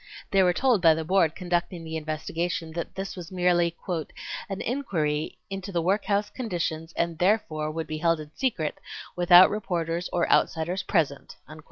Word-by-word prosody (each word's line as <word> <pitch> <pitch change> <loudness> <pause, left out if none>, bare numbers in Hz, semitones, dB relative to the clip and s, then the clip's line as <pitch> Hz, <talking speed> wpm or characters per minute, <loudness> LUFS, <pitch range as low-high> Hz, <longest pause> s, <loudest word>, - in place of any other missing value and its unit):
They 195 - +4
were 180 -1 +5
told 235 +2 +2
by 165 -2 +6
the 160 0 -3
Board 170 -2 +2
conducting 175 -1 -2
the 160 0 -6
investigation 160 +2 -3
that 170 +1 -5
this 195 0 -5
was 175 -2 -9
merely 175 -2 +2 0.7
"an 195 0 -4
inquiry 160 - -2
into 195 0 -6
the 175 - 0
workhouse 200 +3 0
conditions 170 -8 -3
and 170 -1 -2
therefore 175 -6 +1
would 160 +1 -4
be 155 0 -5
held 165 0 +2
in 150 -1 -9
secret 195 - -2 0.4
without 175 +1 +7
reporters 175 -4 -2
or 170 - +1
outsiders 175 +4 +2
present." 145 -8 -1
175 Hz, 160 wpm, -26 LUFS, 160-190 Hz, 0.7 s, without